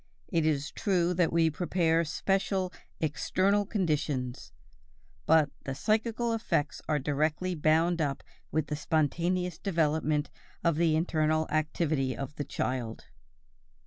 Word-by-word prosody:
It 165 -4 +1
is 150 -1 0
true 180 -3 +1
that 175 -2 +2
we 165 -1 +3
prepare 165 0 +1
special 190 +3 0 0.3
"external 190 +7 +1
conditions"; 150 - -1 0.8
but 155 -2 +5
the 135 - -4
psychical 225 - 0
effects 170 -9 -1
are 150 - +3
directly 150 +5 0
bound 165 +2 +2
up 140 -3 -1 0.3
with 155 -2 +1
the 150 - -3
spontaneous 170 +3 0
development 155 -4 0 0.3
of 170 -3 +2
the 165 -2 +3
internal 155 -1 +1
activity 155 -3 0
of 140 +1 -5
the 145 - -1
child. 120 -4 -3
160 Hz, 120 wpm, -29 LUFS, 150-180 Hz, 0.8 s, but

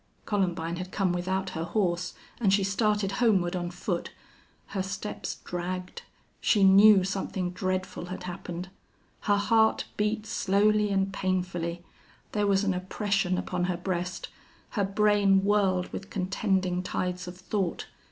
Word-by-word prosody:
Columbine 175 -4 -1
had 185 +1 -6
come 190 -3 +1
without 185 +1 -1
her 160 -2 -3
horse, 175 0 -1 0.2
and 205 -5 +3
she 195 0 +3
started 205 0 +1
homeward 190 -6 +3
on 175 -1 -2
foot. 175 0 -3 0.6
Her 195 - -2
steps 190 +2 -4
dragged. 180 +1 -4 0.4
She 205 -3 +3
knew 195 +1 +8
something 190 -1 -2
dreadful 185 0 -3
had 185 0 -6
happened. 180 0 -6 0.5
Her 205 -1 +2
heart 220 +2 +3
beat 210 +1 0
slowly 210 0 +2
and 195 0 0
painfully; 180 -2 -2 0.5
there 210 -1 +1
was 195 0 +3
an 195 -2 +1
oppression 185 0 0
upon 180 -1 -1
her 180 -1 -1
breast; 180 0 -3 0.4
her 205 - 0
brain 200 -1 +3
whirled 195 -3 +2
with 195 - -6
contending 190 -1 0
tides 180 -1 -3
of 180 0 -8
thought. 185 -1 -2
190 Hz, 140 wpm, -28 LUFS, 180-200 Hz, 0.6 s, knew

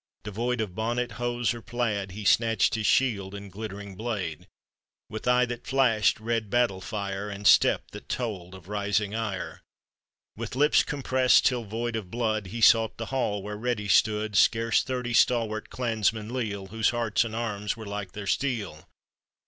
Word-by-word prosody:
— - - -50
Devoid 115 +4 -2
of 105 -5 -4
bonnet, 120 +3 -1
hose, 120 +1 -1
or 120 - -8
plaid, 110 -6 -2
He 105 +1 -7
snatched 115 +2 +3
his 110 -2 0
shield 100 -7 +1
and 100 -1 -9
glittering 100 -1 -7
blade; 100 -8 -4 0.6
With 110 +3 -6
eye 125 0 +4
that 120 0 -7
flashed 125 -8 +3
red 115 -1 -2
battle 115 -5 +1
fire, 100 -1 -4
And 100 0 -7
step - - +5
that - - -11
told 95 -7 -4
of 95 -2 -14
rising 105 0 -1
ire, 110 -4 -4 0.7
With - - -6
lips 150 +3 +4
compressed 130 -3 +2
till 125 -3 +1
void 115 +3 -3
of 105 -5 -5
blood, 110 -2 -1
He 115 +5 -6
sought 115 -1 +5
the 115 +3 -6
hall 105 -7 -1
where 105 +1 -5
ready 110 -2 -2
stood 105 +1 +2
Scarce 115 +3 +4
thirty 125 -2 -3
stalwart 115 -2 +2
clansmen 110 -2 -1
leal, 105 -6 -3
Whose 110 +1 +1
hearts 120 -2 +1
and 110 -1 -5
arms 105 -2 -2
were 110 - -8
like 100 -2 -5
their 105 -1 -6
steel. 105 - -2
110 Hz, 170 wpm, -27 LUFS, 100-120 Hz, 0.7 s, step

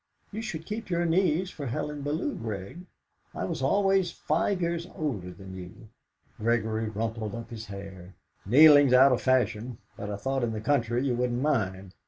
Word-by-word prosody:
"You 220 +2 -4
should 165 -8 -5
keep 215 0 -5
your 175 -1 +1
knees 180 +1 +1
for 145 -3 -6
Helen 150 +3 -3
Bellow, 155 - -1
Grig. 110 - -6 0.5
I - - -2
was - - -4
always 195 -2 +2
five 170 +6 0
years 170 0 -2
older 115 - -3
than 95 +1 -11
you." 95 +5 -11 0.5
Gregory 110 -1 0
rumpled 110 0 -3
up 115 0 -8
his 115 -1 -7
hair. 95 -2 -9 0.3
"Kneeling's 145 +3 +7
out 135 +2 +7
of 125 - +1
fashion, 120 -2 +1 0.2
but 105 - -5
I 105 - -3
thought 135 +6 -2
in 115 -1 -1
the 110 - -3
country 120 0 +1
you 130 - +1
wouldn't 125 +1 -1
mind!" 95 -10 -1
125 Hz, 175 wpm, -28 LUFS, 110-155 Hz, 0.5 s, Kneeling's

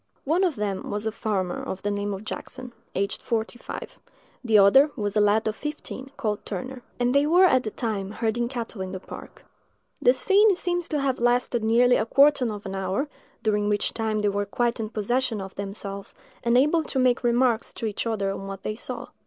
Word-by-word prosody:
One 330 +7 +2
of 350 -6 +1
them 205 -2 -3
was 205 +1 -3
a 220 - 0
farmer 195 -5 -2
of 190 - -6
the 205 - 0
name 205 0 -2
of 195 +1 -5
Jackson, 250 +2 -7 0.2
aged 200 +1 -1
forty 230 +1 -2
five; - - -8 0.4
the 225 -3 +4
other 235 +9 +7
was 205 -2 -2
a 210 - +4
lad 210 +2 +3
of 215 - -1
fifteen, 295 -2 -6
called 215 -6 -2
Turner: 250 +6 -6 0.2
and 245 0 +2
they 280 +1 +4
were 355 +4 +6
at 260 -8 +4
the 220 - -4
time 210 -4 -3
herding 225 +2 -1
cattle 235 -5 -5
in 185 0 -5
the 190 - -4
park. - - -11 0.6
The - - +6
scene 405 0 +4
seems 350 -1 -1
to 300 - 0
have 270 -2 0
lasted 240 -1 +1
nearly 245 +3 +4
a 220 - -1
quarter 275 -3 +4
of 205 -1 -7
an 195 - -5
hour, 195 +9 -2 0.3
during 210 -2 +1
which 205 -1 0
time 220 -2 -1
they 205 - +2
were 200 0 -1
quite 240 +3 0
in 215 -1 -3
possession 230 +2 0
of 190 0 -7
themselves, 200 0 -6 0.3
and 235 +1 +3
able 300 +5 +4
to - - -4
make 255 -1 +3
remarks 240 -1 +2
to - - -5
each 215 +1 -2
other 200 -3 0
on 195 0 -6
what 195 0 -7
they 215 - -2
saw. 225 - -7
225 Hz, 210 wpm, -25 LUFS, 205-255 Hz, 0.6 s, other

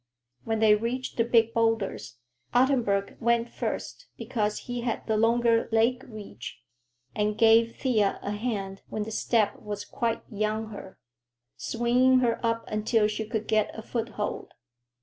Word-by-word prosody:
When 225 0 0
they 220 -1 +5
reached 235 +4 -2
the 230 - +4
big 230 -1 +3
boulders, 225 - -1 0.4
Ottenburg 245 -7 +2
went 235 0 +1
first - - -5
because 210 -3 -2
he 245 -1 -4
had 235 -1 -3
the 220 - 0
longer 230 +1 +3
leg 235 +3 +2
reach, 205 - -9 0.5
and 210 0 0
gave 230 0 +5
Thea 220 -7 +1
a 200 - -3
hand 205 -3 -3
when 215 - -2
the 220 - -6
step 220 -1 +1
was 205 -1 -5
quite 230 -1 -2
beyond 215 +1 -2
her, 190 -2 -10 0.6
swinging 245 +2 +2
her 235 -2 0
up 230 0 0
until 215 0 +1
she 215 0 -4
could 220 -1 -3
get 215 0 +1
a 220 - -7
foothold. 225 -3 -4
225 Hz, 150 wpm, -27 LUFS, 210-235 Hz, 0.6 s, they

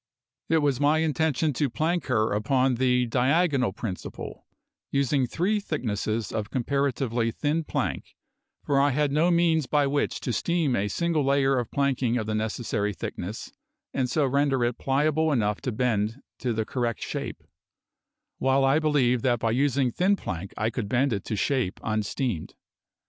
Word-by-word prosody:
It 160 -2 +3
was 140 -3 +1
my 145 +2 +3
intention 160 -1 +1
to 145 +2 0
plank 165 +7 -1
her 110 -1 +1
upon 130 +5 +2
the 125 0 +2
diagonal 130 - +2
principle, 95 -2 -7 0.4
using 140 -1 +1
three 190 - 0
thicknesses 110 - -2
of 110 -2 -3
comparatively 130 -3 0
thin 150 +7 -1
plank, - - -3 0.5
for 140 -1 +2
I 145 - +4
had 145 +1 +1
no 155 +5 +3
means 170 -4 +2
by 145 -1 +2
which 140 +1 0
to 125 - -2
steam 165 -5 +1
a 100 -1 0
single 165 +7 0
layer 135 0 +3
of 120 -3 -1
planking 135 -4 +1
of 110 - -2
the 110 - -2
necessary 110 -1 -2
thickness 95 +5 -6 0.4
and 130 -2 0
so 150 +3 +2
render 135 -1 +2
it 120 0 -1
pliable 155 +3 +1
enough 105 -6 0
to 130 - -2
bend 110 0 0 0.2
to 125 - -1
the 110 -1 -1
correct 120 -3 -2
shape; - - -5 1.0
while 135 +1 +3
I 135 +3 +4
believed 135 -6 +2
that 120 -2 +3
by 115 0 0
using 135 0 +2
thin 190 +9 +2
plank 95 - -5
I 110 +2 0
could 110 -3 -4
bend 130 +2 +2
it 100 - -3
to 110 - -2
shape 120 -3 0
unsteamed. 110 - -2
130 Hz, 165 wpm, -26 LUFS, 115-145 Hz, 1.0 s, I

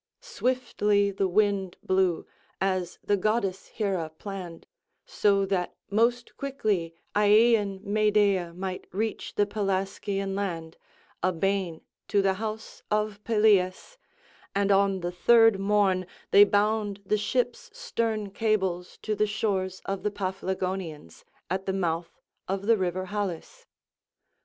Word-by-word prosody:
Swiftly 250 - 0
the 195 0 0
wind 195 -1 +1
blew, 185 -3 +1 0.3
as 185 -2 -1
the 205 - +2
goddess 200 -1 -1
Hera 190 -7 -2
planned, 180 0 -8 0.4
so 200 - +2
that 190 -2 -1 0.2
most 235 +3 +1
quickly 210 -12 -1 0.2
Aeaean 210 -1 +4
Medea 205 -4 +2
might 185 +1 -5
reach 220 +4 -3
the 205 - +3
Pelasgian 195 -1 -2
land, 170 -5 -3 0.5
a 185 - +2
bane 185 -1 -1 0.3
to 200 -2 +2
the 195 -1 +3
house 220 0 -5
of 210 -1 -1
Pelias, 210 - +2 0.6
and 200 0 +2
on 195 -1 +3
the 175 0 -2
third 225 +3 +5
morn 195 -2 +2 0.2
they 205 +1 +9
bound 205 0 +1
the 210 - +2
ship's 255 - -1
stern 230 - -2
cables 190 -5 -1
to 215 - -1
the 210 0 +1
shores 195 -3 -2
of 195 -1 -3
the 210 - 0
Paphlagonians, 185 - -4 0.2
at 190 +3 -3
the 190 - 0
mouth 170 -3 -2 0.3
of 195 +1 -2
the 230 +1 +5
river 185 -2 -2
Halys. 205 - -5
200 Hz, 125 wpm, -27 LUFS, 185-215 Hz, 0.6 s, they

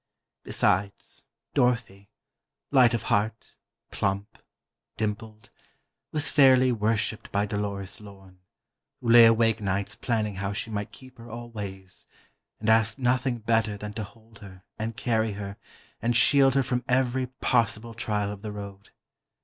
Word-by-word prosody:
Besides, 100 +2 -1 0.3
Dorothy—light 120 +2 0
of 115 - -4
heart, 110 +1 -1 0.3
plump, 100 +2 -3 0.6
dimpled—was 110 +7 -6
fairly 130 -2 +5
worshiped 110 0 -1
by 100 0 +1
Dolores 100 -1 -4
Lorne, 95 -3 -15 0.6
who 115 - 0
lay 120 0 +9
awake 115 0 +3
nights 100 0 -2
planning 110 -4 -2
how 100 +1 -3
she 100 +2 -5
might 105 -1 -4
keep 130 -2 -15
her 115 +1 -11
always, 105 -5 -8 0.5
and 110 - -5
asked 110 0 +3
nothing 125 -1 0
better 115 -2 0
than 105 0 -7
to 110 +1 -4
hold 110 +1 -16
her 95 -2 -13 0.2
and 110 +1 -4
carry 110 -4 0
her 100 0 -7 0.4
and 120 +1 0
shield 135 +1 +5
her 135 - +3
from 125 0 -2
every 130 0 +1
possible 115 -3 -1
trial 105 -2 -2
of 100 -1 -9
the 105 - -6
road. 100 -1 -9
110 Hz, 135 wpm, -26 LUFS, 100-120 Hz, 0.6 s, lay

